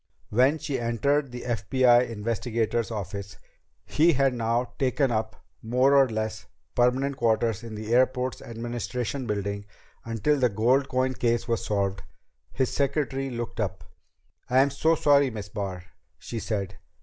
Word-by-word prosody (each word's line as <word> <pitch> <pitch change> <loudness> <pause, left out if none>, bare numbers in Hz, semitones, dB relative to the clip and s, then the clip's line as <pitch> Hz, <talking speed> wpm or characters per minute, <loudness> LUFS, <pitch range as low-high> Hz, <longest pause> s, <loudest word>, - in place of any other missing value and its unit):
When 130 +7 +4
she 150 -3 -3
entered 135 +4 0
the 125 0 -7
FBI 120 +2 +3
investigator's 115 +1 -1
office 100 -2 -6 0.5
he 165 +3 +3
had 135 -1 +2
now 120 +1 -1
taken 130 0 +1
up 110 -1 -1 0.3
more 125 +5 +3
or 135 -2 +5
less 110 0 -4 0.3
permanent 130 +3 +1
quarters 115 -2 +1
in 115 -2 -8
the 110 +2 -3
airport's 130 0 +2
administration 120 +2 -4
building 100 -1 -3 0.4
until 115 +6 0
the 125 -2 +3
gold 125 +6 +2
coin 130 0 +1
case 120 -1 0
was 115 -2 -1
solved 100 -2 -1 0.5
his 130 -2 -1
secretary 140 -1 -1
looked 120 -2 -5
up. 95 -5 -2 0.7
"I'm 135 +2 +4
so 160 +4 +2
sorry, 140 -3 +4
Miss 105 -5 -7
Barr," 95 -4 -5 0.3
she 115 - -6
said. 100 -4 -3
120 Hz, 140 wpm, -26 LUFS, 110-130 Hz, 0.7 s, or